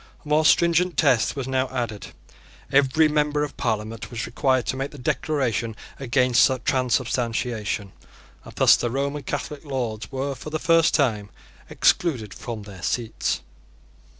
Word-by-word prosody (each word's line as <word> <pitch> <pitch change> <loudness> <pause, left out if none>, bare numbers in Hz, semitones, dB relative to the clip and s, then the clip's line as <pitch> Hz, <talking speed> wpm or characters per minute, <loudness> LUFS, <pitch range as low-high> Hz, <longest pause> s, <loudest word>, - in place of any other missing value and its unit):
A - - -11
more 155 +1 +3
stringent 170 +2 +3
test 135 -7 +3
was 135 -3 -4
now 130 0 0
added: 110 -4 -4 0.6
every 140 +3 +4
member 150 -1 +1
of 145 - -5
Parliament 110 -1 -3
was 115 -2 -4
required 130 -1 +1
to - - -2
make 135 +1 -3
the 145 - -12
Declaration 125 - -1 0.2
against 125 -1 +3 0.2
Transubstantiation; 120 -5 -1 0.5
and - - -13
thus - - +6
the 120 - -2
Roman 140 +3 -2
Catholic 145 +2 -5
Lords 125 -7 -4
were 135 +1 -2
for 145 - -8
the 155 - -2
first 165 0 +3
time 110 -8 +1 0.4
excluded 120 - +1
from 115 -3 -7
their 100 -3 -11
seats. 115 +3 -2
130 Hz, 145 wpm, -24 LUFS, 115-145 Hz, 0.6 s, thus